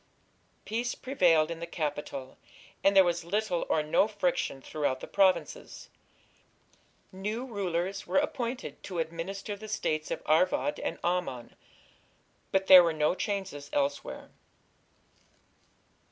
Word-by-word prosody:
Peace 235 +3 -2
prevailed 170 - +3
in 165 - -5
the 170 - -5
capital, 145 -5 -4 0.4
and 195 0 +4
there 190 - +9
was 175 -1 0
little 195 0 -1
or 155 - +2
no 155 +6 +3
friction 185 -9 -1
throughout 135 -1 -2
the - - -7
provinces: 200 - 0 1.2
new 210 +6 -4
rulers 195 -4 -3
were - - +1
appointed 255 -3 -2
to 185 - -6
administer 170 +5 -4
the 215 +2 -10
States 155 -7 -2
of - - -4
Arvad 235 - +2
and - - -3
Ammon, 175 -9 -2 1.0
but 190 0 +2
there 185 -2 +10
were 165 -1 +1
no 155 +1 +2
changes 190 -8 -4
elsewhere. 140 0 -2
180 Hz, 125 wpm, -29 LUFS, 155-205 Hz, 1.2 s, there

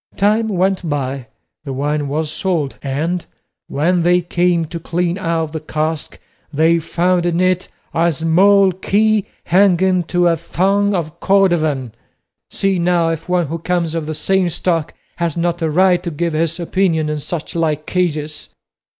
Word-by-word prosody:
Time 215 +3 +2
went 190 -3 0
by, 135 -3 -3 0.4
the 140 - -6
wine 145 +2 -1
was 155 +2 -2
sold, 160 -5 -2
and 160 +6 -2 0.4
when 170 +5 +1
they 175 +1 +4
came 175 -1 +1
to 170 +2 -6
clean 175 +1 -1
out 165 -3 -1
the 160 - -4
cask, 155 0 -3 0.3
they 160 +3 +3
found 175 +2 0
in 170 0 0
it 185 0 +1 0.2
a 170 +1 +2
small 190 +5 +4
key 210 +3 +1 0.2
hanging 185 0 +3
to 175 +1 +1
a 170 - +3
thong 195 +5 +1
of 170 -1 -4
cordovan; 160 - +2 0.6
see 195 -2 0
now 170 -1 +2
if 165 +2 -4
one 180 -1 +2
who 165 +3 -4
comes 170 -1 -1
of 165 -2 -3
the 155 - -3
same 190 +2 +1
stock 165 -2 -2 0.2
has 170 -2 -2
not 170 +1 -1
a 160 - +1
right 180 +3 +3
to 170 - -4
give 170 +1 -2
his 165 +2 -1
opinion 170 -3 0
in 150 0 -2
such 160 +2 -5
like 155 -2 -1
cases." 155 -4 -2
170 Hz, 160 wpm, -18 LUFS, 155-180 Hz, 0.6 s, they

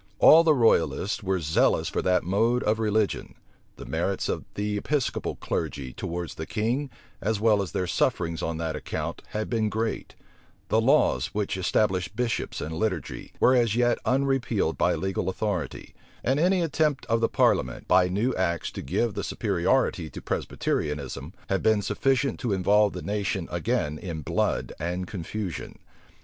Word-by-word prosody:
All 165 +2 +8
the 155 -2 +4
royalists 100 - +2
were 95 -2 0
zealous 80 -1 +2
for - - -1
that 90 0 +2
mode 115 +7 +1
of 110 +1 +1
religion; 110 -1 0 0.4
the - - -10
merits - - -1
of - - -2
the 105 0 -1
Episcopal 140 +6 -1
clergy 65 -3 -3
towards 85 0 -4
the 80 - -6
king, 120 +6 -1 0.3
as 110 +1 0
well 105 -2 +4
as 95 -5 -4
their 90 - -1
sufferings 85 -4 0
on 80 -1 -2
that 80 -1 -2
account, - - -4
had 110 0 -3
been 110 -3 0
great; 110 +1 -3 0.5
the 110 - +3
laws 135 -2 +2
which 105 -3 -1
established 95 -1 0
bishops 120 -1 -2
and 80 - -4
the 80 - -4
liturgy, 95 -6 -3
were 130 - +5
as 115 -4 +2
yet 120 0 +2
unrepealed 135 0 +1
by - - +2
legal 95 -1 -2
authority; 95 -7 -3 0.3
and 130 +4 +1
any 180 +2 +3
attempt 150 -3 0
of 115 0 +1
the 115 - +2
parliament, 65 -1 +1
by 90 0 +5
new 105 +8 0
acts, 85 -3 -1
to - - -6
give 115 - 0
the - - -4
superiority 95 -3 0
to - - -8
Presbyterianism, 70 0 -3 0.2
had 95 -1 0
been 110 -2 +3
sufficient 135 +4 +1
to 115 -5 -1
involve 100 +2 +3
the - - -6
nation 100 -1 -2
again 75 +1 -1
in 80 -3 -5
blood - - -1
and 90 +3 -2
confusion. 95 +1 -5
105 Hz, 165 wpm, -26 LUFS, 85-115 Hz, 0.5 s, All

